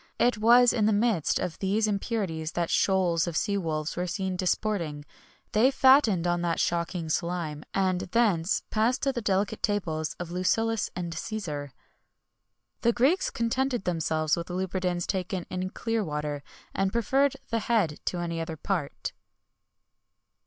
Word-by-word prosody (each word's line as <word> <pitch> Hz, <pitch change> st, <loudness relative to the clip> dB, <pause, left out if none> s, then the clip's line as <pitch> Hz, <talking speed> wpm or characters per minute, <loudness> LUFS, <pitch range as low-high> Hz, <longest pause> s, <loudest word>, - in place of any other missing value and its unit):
It 245 Hz, -3 st, +2 dB
was 240 Hz, +2 st, +6 dB
in 215 Hz, -3 st, +2 dB
the 215 Hz, -, +3 dB
midst 205 Hz, -6 st, +2 dB
of 180 Hz, -3 st, -3 dB
these 205 Hz, +3 st, +1 dB
impurities 195 Hz, -6 st, -2 dB
that 170 Hz, -1 st, -1 dB
shoals 180 Hz, -4 st, +2 dB
of 165 Hz, -2 st, -2 dB
sea 205 Hz, -2 st, 0 dB
wolves 155 Hz, -5 st, -2 dB
were 180 Hz, +1 st, -2 dB
seen 190 Hz, +1 st, -2 dB
disporting; 180 Hz, -5 st, -1 dB, 0.5 s
they 225 Hz, +5 st, +5 dB
fattened 260 Hz, -, +5 dB
on 175 Hz, 0 st, +1 dB
that 170 Hz, -1 st, 0 dB
shocking 170 Hz, 0 st, -1 dB
slime, 160 Hz, -2 st, -2 dB
and 185 Hz, -2 st, +1 dB
thence 190 Hz, -3 st, +1 dB
passed 225 Hz, +4 st, +1 dB
to 275 Hz, -1 st, +2 dB
the 240 Hz, -, -3 dB
delicate 200 Hz, -1 st, 0 dB
tables 175 Hz, -6 st, -1 dB
of 175 Hz, -1 st, -5 dB
Lucullus 225 Hz, +5 st, +1 dB
and 175 Hz, -2 st, -4 dB
Cæsar.[XXI 160 Hz, -5 st, -4 dB
87] 140 Hz, -, -15 dB, 1.1 s
The 235 Hz, 0 st, +3 dB
Greeks 275 Hz, +11 st, +2 dB
contented 245 Hz, 0 st, -1 dB
themselves 160 Hz, -3 st, 0 dB
with 170 Hz, 0 st, -5 dB
lubridans 180 Hz, -1 st, -1 dB
taken 185 Hz, -1 st, -2 dB
in 185 Hz, 0 st, -2 dB
clear 225 Hz, +2 st, -2 dB
water, 150 Hz, -3 st, -3 dB, 0.3 s
and 195 Hz, 0 st, 0 dB
preferred 265 Hz, +5 st, +2 dB, 0.2 s
the 230 Hz, -, +1 dB
head 210 Hz, -9 st, +1 dB
to 180 Hz, -, -1 dB
any 170 Hz, -1 st, -2 dB
other 160 Hz, -1 st, -5 dB
part. 145 Hz, -1 st, -3 dB
185 Hz, 150 wpm, -27 LUFS, 170-220 Hz, 1.1 s, was